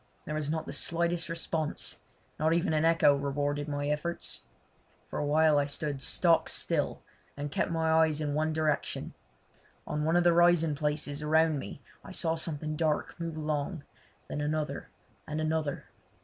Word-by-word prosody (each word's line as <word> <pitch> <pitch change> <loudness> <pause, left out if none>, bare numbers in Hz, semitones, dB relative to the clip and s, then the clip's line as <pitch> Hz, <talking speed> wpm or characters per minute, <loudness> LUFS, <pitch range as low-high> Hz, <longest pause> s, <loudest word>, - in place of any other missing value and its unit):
There 150 - -4
was 155 -1 -2
not 160 0 -1
the - - -6
slightest 170 0 0
response; 165 -2 -2 0.4
not 160 +2 +3
even 170 0 +1
an 155 0 +2
echo 165 -3 +5
rewarded 145 +1 -1
my 145 -1 -2
efforts. 150 +4 -2 0.7
For - - -2
a - - 0
while 155 0 +4
I 140 - +1
stood 145 -1 -2
stock 165 +3 +3
still - - -1 0.3
and 145 0 -4
kept - - 0
my 160 -1 +1
eyes 160 -1 +4
in 150 -2 -1
one 155 +2 +1
direction. 155 -2 -1 0.7
On 150 - -2
one 160 +2 +2
of 175 - +5
the 175 -1 +5
rising 170 -2 +5
places 150 0 -1
around 155 0 +3
me 120 +4 -8 0.2
I 190 - -9
saw 165 -3 +1
something 155 -2 -3
dark 155 -1 0
move 165 -2 -4
along, 155 +1 -2 0.4
then 145 - -3
another, 150 +1 -2 0.4
and 155 +1 -3
another. 155 -2 -1
155 Hz, 165 wpm, -30 LUFS, 145-165 Hz, 0.7 s, echo